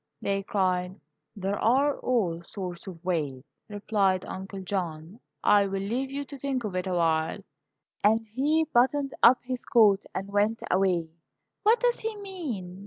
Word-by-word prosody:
they 195 0 -1
cried. 185 -1 -1 0.4
"There 195 0 -2
are 275 +5 +2
all 190 -10 0
sorts 180 0 -7
of 175 -2 -10
ways," 145 -6 -3
replied 200 -3 0
Uncle 190 +1 -7
John. 175 0 -4 0.2
"I 205 -1 +5
will 195 0 -3
leave 250 +7 -2
you 280 +1 -4
to 280 0 -10
think 265 -2 -2
of 205 -4 -4
it 185 +1 -2
awhile," 165 -3 +1 0.6
and 215 +2 +5
he 300 +6 +2
buttoned 270 +3 +2
up 245 +2 +8
his 255 0 -4
coat 205 -4 +4
and 190 +1 -3
went 205 +3 +2
away. 180 -3 +2 0.5
"What 445 +3 +4
does 485 -1 +2
he 440 0 -3
mean?" 290 - -6
200 Hz, 155 wpm, -27 LUFS, 185-255 Hz, 0.6 s, up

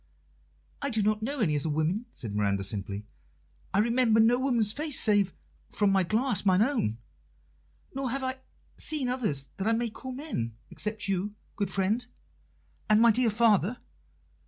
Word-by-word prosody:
"I 280 - -1
do 220 -4 +1
not 215 +1 +1
know 270 +4 -2
any 155 -8 +2
other 145 +2 -1
woman," 160 +10 -1
said 110 -4 -7
Miranda 100 -1 0
simply. 100 +1 -2 0.7
"I - - 0
remember 230 +1 +3
no 235 +3 +5
woman's 235 -6 +1
face 300 0 0
save, 205 -3 +3 0.4
from 205 -2 +2
my 195 0 +4
glass, 215 +3 +1
mine 190 0 +4
own. 230 - 0 1.0
Nor 270 -1 -2
have 270 +2 -3
I 260 0 -3 0.4
seen 290 -5 -1
others 185 - -1
that 195 - -2
I 225 - +3
may 230 0 -1
call 260 +4 -8
men, 250 - -4 0.2
except 215 0 -2
you, 195 +2 -1 0.2
good 200 -4 -1
friend, 195 +5 0 0.9
and 215 0 +6
my 235 0 +7
dear 240 +1 +2
father. 220 0 +3
215 Hz, 160 wpm, -28 LUFS, 185-245 Hz, 1.0 s, my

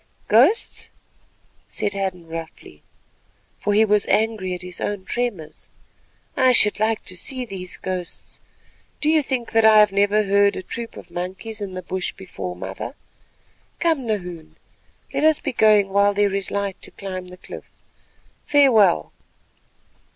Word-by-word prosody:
"Ghosts," 270 - +3 0.8
said 205 - -2
Hadden 190 -3 -3
roughly, 160 - -9 0.8
for 205 - -1
he 220 +1 +5
was 210 -1 +2
angry 215 -4 0
at 180 - -9
his 180 -1 -8
own 205 -2 -3
tremors, 205 -11 -4 0.7
"I 260 -1 +4
should 210 -4 +4
like 220 0 0
to 185 - -6
see 255 +7 -2
those 185 -4 -6
ghosts. 185 -2 -6 0.6
Do 305 - +2
you 315 -1 +4
think 260 -4 -3
that 225 0 +3
I 220 -1 +7
have 210 -1 +6
never 205 +2 +2
heard 200 0 +3
a - - -5
troop 230 +3 -7
of - - -12
monkeys 190 +5 -6
in 195 -2 -5
the 185 - -6
bush 185 +1 -3
before, 95 - -7
mother? 95 - -7 0.8
Come, 320 -8 0
Nahoon, 180 -7 -5 0.6
let - - -1
us 315 -1 +4
be 280 - -4
going 210 -3 +4
while 200 +1 +3
there 205 -1 +2
is 195 -1 -2
light 200 -1 -3
to - - -7
climb 185 -2 -7
the 180 0 -12
cliff. - - -11 0.7
Farewell." 230 - +4
200 Hz, 150 wpm, -22 LUFS, 185-225 Hz, 0.8 s, I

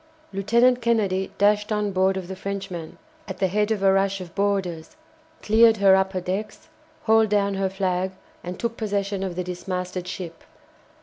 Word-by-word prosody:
Lieutenant 235 +6 +3
Kennedy 205 -5 +1
dashed 210 +1 +2
on 210 -1 0
board 190 0 +2
of 185 -2 -5
the 190 - -6
Frenchman, 190 -4 -6 0.3
at 190 -2 -6
the 190 - +1
head 210 +3 0
of 210 -3 -1
a 195 0 +5
rush 195 0 +1
of 180 -2 -9
boarders, 190 -5 -1 0.5
cleared 225 +1 +5
her 195 -1 +6
upper 190 -1 0
decks, 190 +4 -5 0.3
hauled 220 -1 +4
down 200 -1 +2
her 195 0 0
flag, 190 -1 -1 0.3
and 180 +1 -6
took 230 -1 -3
possession 200 -2 -2
of 190 -2 -3
the 180 - -2
dismasted 180 0 -4
ship. 175 -3 -7
195 Hz, 170 wpm, -24 LUFS, 185-210 Hz, 0.5 s, her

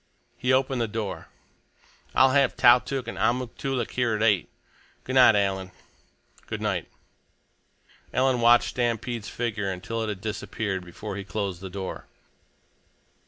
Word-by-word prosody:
He 125 - 0
opened 130 -1 +2
the 115 - 0
door. 105 -2 -5 0.9
"I'll 130 0 +6
have 140 -1 +3
Tautuk 125 +2 +4
and - - -6
Amuk 125 0 0
Toolik 130 -4 -2
here 120 -3 0
at 105 - -1
eight. 105 -5 +2 0.5
Good 130 - -5
night, 125 -4 +7
Alan!" 95 -2 0 0.8
"Good - - -4
night!" - - -2 1.2
Alan 130 -1 +2
watched 120 +1 +5
Stampede's 120 -2 -2
figure 110 -4 -2
until 95 +5 -4
it 110 - -2
had 100 -3 -4
disappeared 100 -2 -3
before 100 +3 -7
he 100 - -5
closed 100 -3 -4
the 95 - -6
door. 95 0 -6
115 Hz, 140 wpm, -26 LUFS, 100-125 Hz, 1.2 s, night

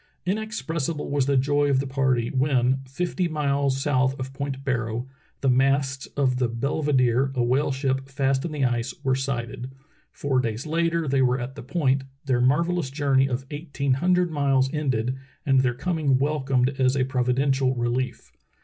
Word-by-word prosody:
Inexpressible 175 -8 -2
was 140 -2 +1
the 140 -1 +3
joy 145 +2 +2
of 135 -2 +3
the 135 - -1
party 130 -3 +1
when, 130 -2 +2
fifty 175 +6 -1
miles 140 -3 0
south 135 -1 +1
of 130 +1 -5
Point 135 -1 -4
Barrow, 120 -2 -2 0.3
the 135 - 0
masts 135 +1 +2
of 130 -3 +2
the 125 -2 +1
Belvederey 130 0 +1
a 125 - +1
whale 135 +4 +1
ship 135 0 -1
fast 135 0 0
in 170 - -3
the 145 -3 0
ice, 120 0 -1
were 130 - +2
sighted. 130 -2 -3 0.4
Four 135 -2 0
days 115 +1 -2
later 165 0 0
they 135 0 +2
were 125 0 +2
at 125 +2 -5
the - - -9
point, 135 -1 0 0.2
their 130 -3 +1
marvellous 165 +4 +2
journey 135 -1 +2
of 130 +1 -3
eighteen 145 -3 -2
hundred 180 +4 +2
miles 135 -2 +1
ended 130 -4 -1 0.3
and 135 -2 +4
their 125 -2 +1
coming 150 -2 +1
wel 145 +2 0
comed 130 -1 +2
as 130 +1 +3
a 130 - +2
providential 130 +1 +1
relief. 120 - -2
135 Hz, 170 wpm, -25 LUFS, 130-145 Hz, 0.4 s, and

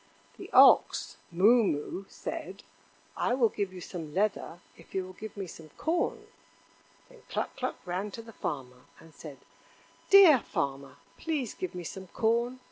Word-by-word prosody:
The - - -9
ox, - - +5
Moo 215 +8 +5
moo, 185 +2 -2
said: 190 +2 -7 0.5
"I 245 - 0
will 240 -4 +3
give 200 -3 -3
you 185 - -9
some 165 -3 -7
leather 195 -3 -1 0.2
if 165 - -16
you 190 -1 -1
will 185 - -11
give 215 +2 -9
me 195 - -4
some 160 -2 -12
corn." 340 +2 -1 0.8
Then - - -18
Cluck - - -3
cluck - - -3
ran 185 +3 -3
to 230 - -7
the 225 0 -13
Farmer 125 -8 -6
and 165 -1 -17
said: 145 -2 -10 0.7
"Dear 380 -9 +9
Farmer, 140 -9 -4 0.2
please 295 -8 -2
give 185 -1 -6
me 180 - -5
some 190 +3 -8
corn. 235 +6 0
190 Hz, 160 wpm, -29 LUFS, 165-230 Hz, 0.8 s, Dear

